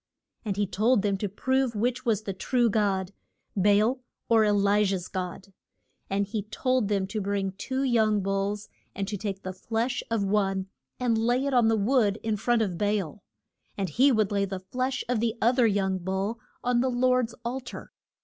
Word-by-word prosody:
And 200 -4 -3
he 205 - +2
told 215 +3 +2
them 200 -1 +1
to 205 - -2
prove 260 +4 0
which 245 +3 -1
was 215 -2 +1
the 195 - -3
true 240 +4 +1
God, 195 -3 0 0.4
Ba 200 +1 +4
al 235 +5 +2 0.3
or 225 -1 +5
E 210 - +3
li 205 0 +3
jah's 190 -3 -1
God. 185 +1 -6 0.6
And 200 +1 +1
he 210 +1 -3
told 250 +2 0
them 200 -2 0
to 210 +2 -4
bring 195 -1 -1
two 260 +7 -3
young 220 -5 +2
bulls, 195 +2 -2 0.3
and 195 -1 -3
to 210 - -3
take 195 -1 -4
the 185 - -4
flesh 225 +6 -2
of 225 -3 0
one 195 -1 +1 0.3
and 235 -3 +1
lay 245 +4 +1
it 280 - -1
on 240 -3 +4
the 225 0 +3
wood 215 -1 +2
in 220 -1 0
front 230 +2 +1
of 180 -5 -3
Ba 210 0 +2
al, 190 0 -5 0.6
and 195 -3 -1
he 265 - +4
would 215 -4 +2
lay 200 -1 +1
the 190 -1 -5
flesh 255 +6 -2
of 245 -2 0
the 230 0 0
oth 245 +3 +2
er 235 - +6
young 190 -2 0
bull 190 +5 -2 0.2
on 245 -1 +2
the 260 - +1
Lord's 250 -1 +1
al 250 +3 -2
tar. 250 -2 -10
210 Hz, 205 wpm, -27 LUFS, 195-240 Hz, 0.6 s, er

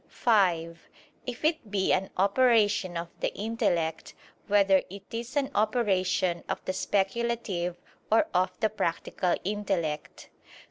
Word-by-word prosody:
(5) 170 -8 +1 0.4
If 250 +4 -4
it 310 -9 0
be 195 -2 +1
an 190 +1 0
operation 205 -3 +3
of 170 0 -4
the - - -1
intellect, 175 -7 -1 0.3
whether 200 -2 +4
it 195 +1 -9
is 235 +4 -5
an 280 -2 0
operation 190 -5 +1
of - - -1
the 185 - -1
speculative 195 -3 -1 0.3
or 225 +7 +5
of 185 0 0
the 220 - +3
practical 175 -2 -1
intellect? 190 -7 -3
200 Hz, 125 wpm, -28 LUFS, 180-225 Hz, 0.4 s, or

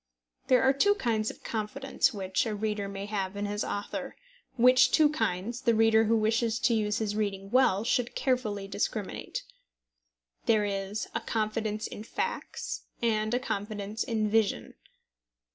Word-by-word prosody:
There 255 -1 +5
are 265 +1 +5
two 405 +9 +3
kinds 225 - 0
of - - -11
confidence 265 +5 -1
which 195 0 -1
a 215 - -2
reader 210 -1 -2
may 195 0 -5
have 200 -2 -3
in 205 - -2
his 205 0 -2
author, 205 0 -4 0.4
which 255 +1 +6
two 310 -2 +5
kinds 225 -2 -2
the 235 -3 +3
reader 225 0 +5
who 225 +2 +3
wishes 225 +1 +1
to 245 - +3
use 210 -1 +1
his 210 -2 -2
reading 195 -2 -2
well 240 -6 +4
should 240 +1 0
carefully 215 -7 -1
discriminate. 200 0 -3 1.0
There 215 -2 +4
is 200 +1 -3
a - - -1
confidence 215 -1 -2
in - - -7
facts 470 - -4 0.2
and 215 -2 +1
a - - +2
confidence 210 -2 -3
in 220 -4 0
vision. 215 -1 +1
215 Hz, 155 wpm, -29 LUFS, 205-235 Hz, 1.0 s, which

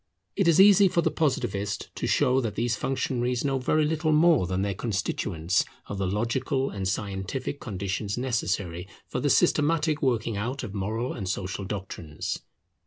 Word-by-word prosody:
It 195 - +2
is 170 +1 +5
easy 200 0 +8
for 170 -2 +1
the - - +1
Positivist 120 - -1
to - - -3
show 130 -2 +3
that 110 -4 -3
these 120 -1 0
functionaries 125 0 -1
know 135 -1 +1
very 155 +4 +2
little 155 +1 0
more 155 - +4
than 95 +2 -1
their 100 -1 -1
constituents 95 -5 -1 0.2
of 100 - -6
the 95 - 0
logical 130 +7 -1
and 95 -2 -3
scientific 100 +7 -3
conditions 100 0 -3
necessary 100 -8 -2 0.2
for - - -3
the - - +1
systematic 155 0 +2
working 115 -5 0
out 125 +7 -3
of 105 -5 -6
moral 110 +5 -2
and 95 -5 -4
social 100 0 -3
doctrines. 95 -6 -5
115 Hz, 165 wpm, -27 LUFS, 100-140 Hz, 0.2 s, easy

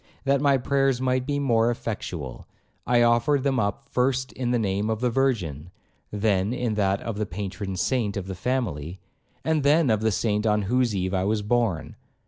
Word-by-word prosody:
That 140 0 +2
my 140 -2 +4
prayers 135 0 +1
might 130 0 0
be 145 -1 0
more 120 -5 +2
effectual, 90 - -5 0.4
I 120 -1 +4
offered 120 +4 +3
them 135 -2 +1
up 100 +6 -2
first 130 +1 0
in 125 -2 -2
the 120 - +2
name 105 -1 -1
of 110 -1 -1
the 125 0 +1
Virgin, 95 - -1 0.4
then 105 0 0
in 125 -3 -1
that 100 -2 +1
of 110 -3 -4
the 105 - -1
Patron 95 +1 -5
saint 105 0 0
of 95 - -3
the 95 - -5
family, 95 - -2 0.5
and 160 -1 +2
then 145 -1 +4
of 110 -1 +1
the 110 0 +2
Saint 105 +1 0
on 105 -1 +2
whose 120 +1 +1
eve 95 0 -1
I 95 0 +1
was 105 +1 0
born. 105 -6 0
115 Hz, 190 wpm, -25 LUFS, 100-130 Hz, 0.5 s, my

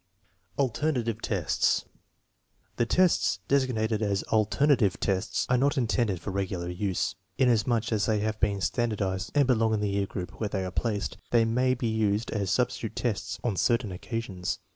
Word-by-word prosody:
Alternative 125 -4 0
tests. 95 -7 +1 0.9
The 120 - +1
tests 95 - +3
designated 115 -5 +1
as 100 -2 0
" - - -4
alternative 110 0 +3
tests 95 -1 0
" - - -37
are 125 0 +3
not 140 +2 +2
intended 110 -6 +1
for 100 - -5
regular 95 -2 -2
use. 90 -1 -1 0.2
Inasmuch 120 -2 +2
as 110 -2 +1
they 110 -1 +2
have 110 +1 -2
been 100 -2 +1
standardized 100 -5 -1
and 145 -1 +5
belong 115 -3 +2
in - - -1
the 105 -1 0
year 100 0 0
group 90 -2 -7
where 105 - 0
they 95 -2 -2
are 90 - -4
placed, 105 +1 -2
they 115 -1 +4
may 125 +3 +2
be 120 - -4
used 110 -1 0
as 100 -3 -1
substitute 125 -2 -1
tests 115 -5 -2
on 115 -5 0
certain 115 -2 +1
occasions. 95 -1 -4
110 Hz, 170 wpm, -28 LUFS, 100-120 Hz, 0.9 s, and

